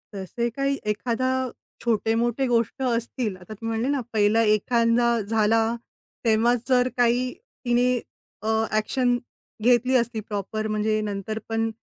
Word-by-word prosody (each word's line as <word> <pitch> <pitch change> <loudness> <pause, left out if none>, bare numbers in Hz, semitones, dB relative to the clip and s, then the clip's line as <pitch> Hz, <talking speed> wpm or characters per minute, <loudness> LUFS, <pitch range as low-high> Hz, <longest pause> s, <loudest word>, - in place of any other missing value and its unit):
तसे 200 +5 -2
काही 275 0 +1
एखादा, 240 +4 -1 0.5
छोटे-मोठे 235 +3 +1
गोष्ट 235 +2 0
असतील. 235 -3 -1
आता 185 +4 -10
तुम्ही 225 +2 -7
म्हणले 235 +3 0
ना, 275 - -1
पहिला 215 +1 +3
एखादा 235 +2 +2
झाला, 220 +1 +2 0.6
तेव्हाच 230 +2 +3
जर 250 -1 +4
काही 245 +1 +2 0.3
तिने 245 +1 +2 0.4
अ, 215 - -5 0.3
एक्शन 245 +3 +1 0.5
घेतली 245 +2 +4
असती. 235 -1 -1
प्रॉपर 215 +1 -4
म्हणजे, 215 0 0
नंतर 210 +1 -3
पण 225 0 0
230 Hz, 125 wpm, -25 LUFS, 215-245 Hz, 0.6 s, जर